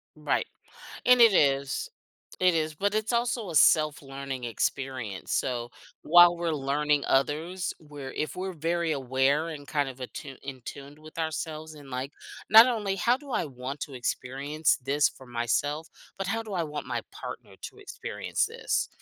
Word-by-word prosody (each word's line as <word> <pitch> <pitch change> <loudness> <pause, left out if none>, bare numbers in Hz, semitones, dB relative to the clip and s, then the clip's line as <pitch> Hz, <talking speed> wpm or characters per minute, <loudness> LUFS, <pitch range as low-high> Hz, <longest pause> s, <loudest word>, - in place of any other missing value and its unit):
Right, - - 0 0.6
and 250 -1 +6
it 230 -2 +8
is, 140 -2 +2 0.5
it 180 -2 +5
is, 155 -1 0
but 200 +6 0
it's 215 +2 0
also 235 -4 0
a - - -6
self-learning 140 -4 +2
experience, 120 -3 -3
so 120 -2 -1 0.3
while 175 +1 +7
we're 170 -1 -1
learning 145 +1 +1
others, 160 +7 0
we're 145 -4 -8
if 155 - -3
we're 190 +1 -3
very 165 +1 0
aware 135 +3 +1
and 150 -3 -7
kind 145 -2 0
of 130 -1 -9
atu 130 +1 -7
in 135 -1 -7
tuned 140 +1 -9
with 155 +1 -13
ourselves 160 0 -3
and, 145 -3 -13
like, 130 +2 -3 0.4
not 220 +3 +10
only, 210 -6 -1
"How 240 +6 +3
do 280 +1 -13
I - - 0
want 135 0 -6
to 140 - -5
experience 135 +5 0
this 145 +3 +3
for 130 - -15
myself, 135 +6 -1 0.3
but 195 - -3
how 225 +3 0
do 215 -2 -9
I 175 - +1
want 150 -2 -5
my - - -2
partner - - -8
to - - -7
experience 480 +5 -2
this?" 465 +2 -1
150 Hz, 165 wpm, -28 LUFS, 135-175 Hz, 0.6 s, not